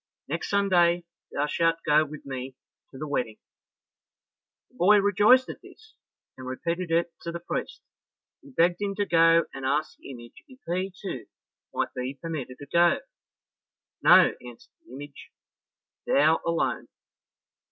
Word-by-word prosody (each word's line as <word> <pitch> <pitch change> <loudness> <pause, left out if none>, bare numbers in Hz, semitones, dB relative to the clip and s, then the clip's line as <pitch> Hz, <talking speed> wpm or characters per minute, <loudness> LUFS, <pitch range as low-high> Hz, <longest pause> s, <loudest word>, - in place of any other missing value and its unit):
Next - - -4
Sunday 175 -4 +3 0.3
thou 145 - -1
shalt 165 +2 +1
go 150 0 +4
with 150 0 -10
me 130 -1 -6 0.3
to 135 - -13
the 155 +3 -5
wedding." 125 -6 -2 1.3
The - - -24
boy 205 +4 +6
rejoiced 205 +6 +4
at - - -8
this, 440 0 -17 0.4
and 130 0 -10
repeated 170 +7 -3
it 165 +1 +1
to 170 - -5
the 170 - -5
priest, 170 - -5 0.6
who 280 -2 -16
begged 175 -4 +2
him 200 -1 -2
to 205 - 0
go 165 -1 +4
and 135 - -8
ask 145 +4 -1
the - - -13
image 120 -3 -12
if 260 -2 -17
he, 185 +3 -2
too, 135 - -6 0.4
might - - -2
be 130 +2 -4
permitted 145 -6 -6
to 145 - -10
go. 170 - +3 1.0
"No," - - +7
answered 120 -1 -13 0.2
the - - -16
image, 140 +2 -10 0.8
"thou 155 +3 +3
alone." 170 0 -1
165 Hz, 150 wpm, -26 LUFS, 140-185 Hz, 1.3 s, No